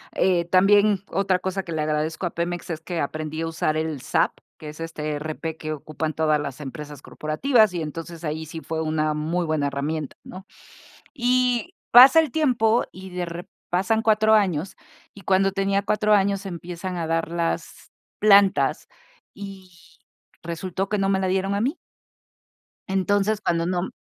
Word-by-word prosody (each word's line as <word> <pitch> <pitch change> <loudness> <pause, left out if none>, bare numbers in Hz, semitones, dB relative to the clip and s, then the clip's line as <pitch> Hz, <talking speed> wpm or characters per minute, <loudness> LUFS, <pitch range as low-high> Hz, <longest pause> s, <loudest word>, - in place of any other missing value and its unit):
eh, 175 -2 +2
también 200 +2 +4
otra 190 -1 +1
cosa 190 +1 -3
que 170 - -8
le 155 -1 -1
agradezco 155 +3 -1
a 175 - -2
Pemex 175 0 -3
es 160 -1 -5
que 170 -1 -4
aprendí 155 +2 -3
a 165 - -2
usar 155 -1 -1
el 155 -4 -3
SAP, - - +1 0.3
que 155 - -9
es 150 +2 -11
este 155 -2 -4
ERP 155 +2 -4
que 155 0 -4
ocupan 155 +1 -4
todas 155 -1 +2
las 140 -1 -6
empresas 145 0 -8
corporativas, 215 - +2
y 165 - -2
entonces 165 +2 -7
ahí 155 +1 -4
sí 160 +1 -7
fue 160 0 -3
una 155 -1 0
muy 165 +3 -1
buena 155 -2 0
herramienta, 145 +2 -3
¿no?, 185 +2 -11 0.7
y 250 +6 +1 0.2
pasa 260 +6 +9
el 310 -5 -1
tiempo 240 -7 +2
y 190 0 -10
de 180 0 -3
rep 175 +3 -7 0.2
pasan 195 +5 +1
4 220 0 +4
años, 190 -4 +1 0.4
y 200 - -13
cuando 195 +1 +2
tenía 195 0 +1
4 210 +1 +1
años 200 -1 +2
empiezan 175 0 -6
a 165 - -2
dar 165 0 -1
las 170 -1 -3 0.3
plantas, 200 -2 +4 0.5
y 195 -2 -10 0.7
resultó 185 +3 -4
que 210 - 0
no 195 0 +1
me 190 -1 +2
la 190 - 0
dieron 190 +1 0
a 200 - 0
mí. 275 +8 0 1.1
Entonces, 205 +2 +1
cuando 170 -4 0
no 180 0 0
m 190 - -4
175 Hz, 170 wpm, -24 LUFS, 155-200 Hz, 1.1 s, pasa